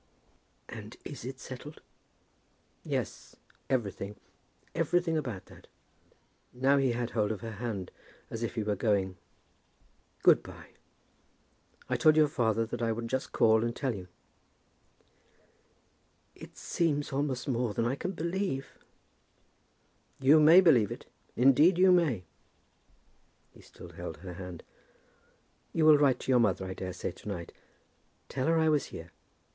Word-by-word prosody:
"And - - -9
is - - -8
it 130 +1 -6
settled?" 145 +4 -9 1.0
"Yes; - - -4 0.3
everything. 105 -5 -2 0.6
Everything 165 +1 +1
about 125 -11 -3
that." - - -16 0.8
Now 135 +3 +2
he 135 -3 +2
had 120 0 -3
hold 105 -2 0
of 105 - -5
her 115 -1 -6
hand 105 -7 -4 0.4
as 115 - -5
if 115 - -3
he 110 - -1
were 105 0 0
going. 95 -5 0 1.1
"Good - - +6
by. - - -13 1.2
I - - 0
told 155 0 +5
your 155 -1 +6
father 115 -5 +1
that 120 +1 -6
I 115 -1 +1
would 115 +1 -4
just 130 +1 -2
call 110 0 +4
and 120 0 -2
tell 135 -4 -1
you." 95 -3 -8 2.3
"It - - -13
seems 150 -4 -1
almost 135 -2 -2
more 120 -5 -1
than 115 - 0
I 120 - +1
can 180 +7 -4
believe." 170 -4 -3 1.4
"You 140 +4 +6
may 160 +5 +8
believe 125 - +4
it; - - -7 0.3
indeed 145 +8 +5
you 185 0 +6
may." 155 - +2 1.3
He - - -17
still - - -13
held - - -7
her 90 -1 -9
hand. 90 -2 -8 1.1
"You 160 -2 +2
will 155 -2 +7
write 135 -4 +4
to - - -2
your 125 - +5
mother 95 -5 +1
I 95 - -5
daresay 90 -1 -5
to - - -14
night. 90 -5 -5 0.8
Tell 130 +1 -2
her 165 0 +3
I 160 0 +3
was 150 -3 +2
here. 85 +1 -10
125 Hz, 140 wpm, -30 LUFS, 110-150 Hz, 2.3 s, may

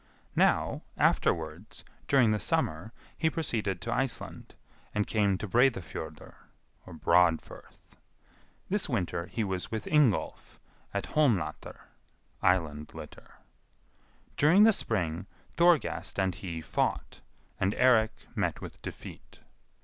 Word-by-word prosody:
Now, - - +2 0.2
afterwards, 80 +5 0 0.2
during 130 -6 +4
the 105 - +1
summer, 85 +2 0 0.2
he 160 - +1
proceeded 110 - -2
to 115 +3 -2
Iceland, 120 -2 -3 0.4
and 105 0 +1
came 100 -3 +1
to 105 - -5
Breidafjordr 115 - 0 0.5
(Broadfirth). 85 -1 0 0.7
This - - -1
winter 85 -1 -2
he 115 - -2
was 95 -3 -3
with 110 -1 -4
Ingolf, 145 -9 +1 0.3
at - - -2
Holmlatr 135 -11 0 0.6
(Island 75 -5 0
litter). - - -11 1.0
During 170 +8 +6
the 220 0 +7
spring, 90 - -2 0.3
Thorgest 170 -3 +2
and 95 -2 +1
he 85 -4 -6
fought, - - -2 0.4
and 95 +2 +1
Eirik 115 -4 +3
met - - -1
with - - -10
defeat. - - -10
105 Hz, 110 wpm, -29 LUFS, 90-125 Hz, 1.0 s, the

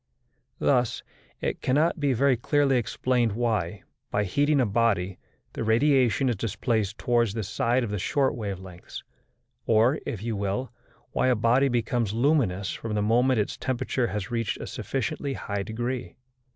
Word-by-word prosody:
Thus 125 -4 +1 0.4
it - - -2
cannot 155 +6 +2
be 145 -2 +2
very 135 +2 +3
clearly 135 +2 +2
explained 120 0 0
why, 105 -5 -1 0.3
by 105 - +1
heating 145 +9 +2
a 130 - +4
body, 100 -4 +1 0.3
the - - -3
radiation 130 +2 +3
is 120 - +1
displaced 110 0 -1
towards 120 -3 +1
the 110 - -2
side 120 +5 0
of 110 - -3
the 105 - -2
short 135 +8 +1
wave 100 -5 -4
lengths, 90 -2 -10 0.6
or, 115 +6 +4
if 105 -2 -4
you 115 -1 -2
will, 100 +6 -2 0.4
why - - +1
a 125 - +4
body 120 +5 +3
becomes 120 -3 0
luminous 115 - +1
from 110 -2 -4
the 105 - +1
moment 120 +3 +3
its 105 - -2
temperature 130 -1 -1
has 105 -2 -4
reached 115 -3 -1
a - - -5
sufficiently 140 +1 -3
high 100 -5 -3
degree. 120 +4 -4
115 Hz, 160 wpm, -26 LUFS, 105-130 Hz, 0.6 s, a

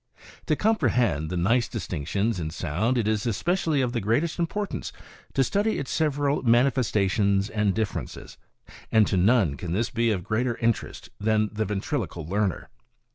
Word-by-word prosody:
To 155 - +3
comprehend 120 - +1
the 90 - -3
nice 115 +7 +2
distinctions 100 +2 -2
in 80 -2 -3
sound 90 - -1
it 115 -3 0
is 110 +1 0
especially 160 - 0
of 125 -2 -1
the 120 - -1
greatest 140 - 0
importance 200 +4 -3 0.4
to 135 - +4
study 205 - 0
its 135 - -4
several 145 -2 +1
manifestations 105 -5 +2
and 105 -3 +1
differences; 110 -2 -4 0.5
and 110 -1 +5
to - - -1
none 95 - +3
can 85 +2 -4
this 110 +5 0
be 115 0 +1
of 95 -5 -1
greater 115 +4 -1
interest 115 -1 -2
than 110 0 +1
the 110 +1 -1
ventriloquial 95 -4 -3
learner. 100 -2 -1
110 Hz, 155 wpm, -26 LUFS, 100-130 Hz, 0.5 s, and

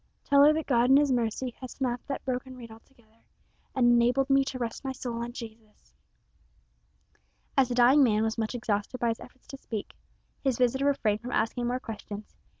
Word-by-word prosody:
Tell 280 0 +5
her 295 - +7
that 315 0 -2
God 245 -2 +2
in 270 - +7
His 290 -1 +3
mercy 245 +1 -1
has 255 - -7
snapped 245 -3 -3
that 275 - -5
broken 255 0 -4
reed 230 -2 -10
altogether, 225 -1 -20 0.5
and 255 -2 +3
enabled 240 +3 +3
me 275 0 +5
to 265 - -4
rest 235 0 -4
my 265 - -3
soul 240 -2 -5
on 240 - -5
Jesus." 225 -3 -12 1.6
As 265 -3 +3
the 245 - -2
dying 250 +4 +6
man 220 -5 +3
was 225 0 -1
much 225 +1 -3
exhausted 215 0 -2
by 235 - +1
his 225 - -2
efforts 255 +1 -15
to 275 - -8
speak, 220 -6 -6 0.5
his 265 -4 +1
visitor 255 +2 +1
refrained 215 -7 +1
from 250 +2 -6
asking 240 +2 0
more 250 +1 -1
questions. 215 -3 -8
245 Hz, 195 wpm, -28 LUFS, 225-265 Hz, 1.6 s, her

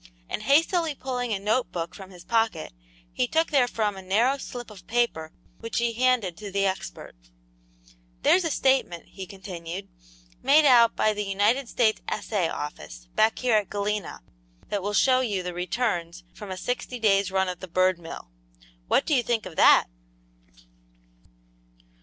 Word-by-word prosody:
And - - -4
hastily 315 - +2
pulling 250 -3 -3
a 205 - +1
note 215 +6 0
book 170 -1 -4
from 190 -2 -11
his 180 -2 -13
pocket, 225 - 0 0.4
he 125 - 0
took 325 +1 +1
therefrom 235 -7 +1
a 190 - -8
narrow 230 +9 +1
slip 240 -4 -8
of 185 -4 -14
paper 225 -10 0 0.3
which 230 0 -5
he 235 -1 +1
handed 240 -7 +1
to 210 -1 -7
the 200 +1 +1
expert. 190 - -4 1.1
"There's 370 - +4
a 330 - 0
statement," 265 - 0
he 190 -1 -8
continued, 190 -1 -8 0.5
"made 300 +2 +5
out 235 -4 +6
by 215 - +2
the 210 0 -3
United 210 +6 +1
States 220 -3 +1
Assay 200 -6 -1
Office, 70 - -7
back 220 +1 +3
here 245 -4 +2
at 205 -2 -1
Galena, 205 - -3 0.5
that 205 - -1
will 205 +2 -3
show 255 +2 +4
you 205 -7 -1
the 180 0 -4
returns 180 -2 -2
from 210 - -10
a 185 - -5
sixty 245 +4 -3
days' 200 -4 +2
run 190 0 +1
at 180 -1 -5
the 185 - -8
Bird 185 +1 +2
mill; 165 - -10 0.6
what - - +2
do 310 - 0
you 255 - +4
think 235 -2 -1
of 180 -3 -9
that?" - - +6
210 Hz, 165 wpm, -26 LUFS, 185-245 Hz, 1.1 s, out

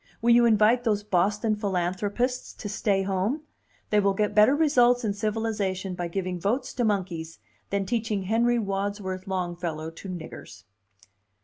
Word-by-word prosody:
Will 235 +1 +3
you 240 0 +6
invite 225 +2 +4
those 210 -3 +1
Boston 210 +3 +1
philanthropists 205 +5 -1
to - - -7
stay 200 -1 0
home? 195 +10 -1 0.5
They 210 - +4
will 200 -1 +2
get 210 +1 0
better 215 +6 +6
results 245 -6 +3
in 205 - 0
civilization 205 -3 -2
by 175 -1 -3
giving 185 0 -3
votes 245 +8 -1
to 245 - -1
monkeys 180 -6 -2 0.3
than 200 -1 -1
teaching 220 -3 -1
Henry 235 +5 +2
Wadsworth 195 -2 -3
Longfellow 175 -4 -3
to 180 +4 -10
riggers." 160 - -9
205 Hz, 145 wpm, -26 LUFS, 185-225 Hz, 0.5 s, you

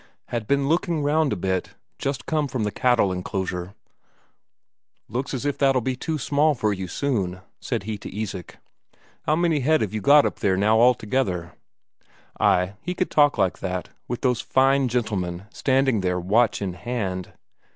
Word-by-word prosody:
Had 115 -3 -3
been 140 0 +2
looking 165 -1 +1
round 150 0 +2
a - - +1
bit 95 0 -2 0.2
just 135 -1 -3
come 155 -2 0
from 125 -3 -2
the 105 - -1
cattle 120 -6 +2
enclosure. 90 0 -4 1.3
"Looks 125 +5 -3
as 135 0 -3
if 145 - -1
that'll 135 -2 +4
be 130 +2 -2
too 155 +5 -3
small 145 +2 +2
for 110 -4 0
you 95 -1 -5
soon," 95 -5 -1 0.2
said - - -3
he 105 0 -4
to - - -8
Isak. 100 -5 -5 0.7
"How 155 - +4
many 165 -2 +2
head 155 +2 +2
have 105 -2 -2
you 110 - -2
got 145 +7 +6
up - - -2
there 95 -2 +1
now 110 +3 +3
altogether?" 110 -7 +1 0.9
Ay, 90 +2 +3
he 180 +1 -4
could 185 - -1
talk 145 -3 +4
like 95 -3 +1
that, 90 -1 -4 0.2
with 120 - -4
those 125 -3 +1
fine 135 0 +3
gentlemen 100 -7 -2
standing 130 -5 +2
there 90 -1 0
watch 105 +4 +2
in 95 -2 -3
hand. 95 -3 -4
120 Hz, 170 wpm, -24 LUFS, 95-140 Hz, 1.3 s, got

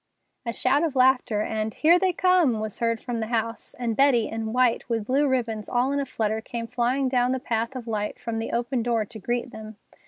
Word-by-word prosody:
A - - 0
shout 260 +4 +1
of 320 -5 -1
laughter, 255 -4 +3
and, 215 0 -2
"Here 335 +9 +4
they 375 0 +2
come!" 350 -10 +3
was 215 -1 -5
heard 230 -1 0
from 240 0 -4
the 220 - -2
house, 230 -1 -3
and 235 -3 -2
Betty, 260 -4 +4
in 225 0 -4
white, 250 0 +1
with 225 -3 -1
blue 275 +5 +2
ribbons 230 -5 -1
all 250 +2 +1
in 285 - 0
a 280 - -2
flutter, 220 -2 -1
came 230 0 -5
flying 250 +3 0
down 250 0 +2
the 260 - -1
path 230 +1 -2
of 250 -3 -6
light 210 -2 -3
from 230 -1 -3
the 225 - -4
open 240 +1 -1
door 230 -2 0
to 220 +2 -11
greet 240 +4 -2
them. 220 -2 -10
235 Hz, 225 wpm, -25 LUFS, 225-260 Hz, -, Here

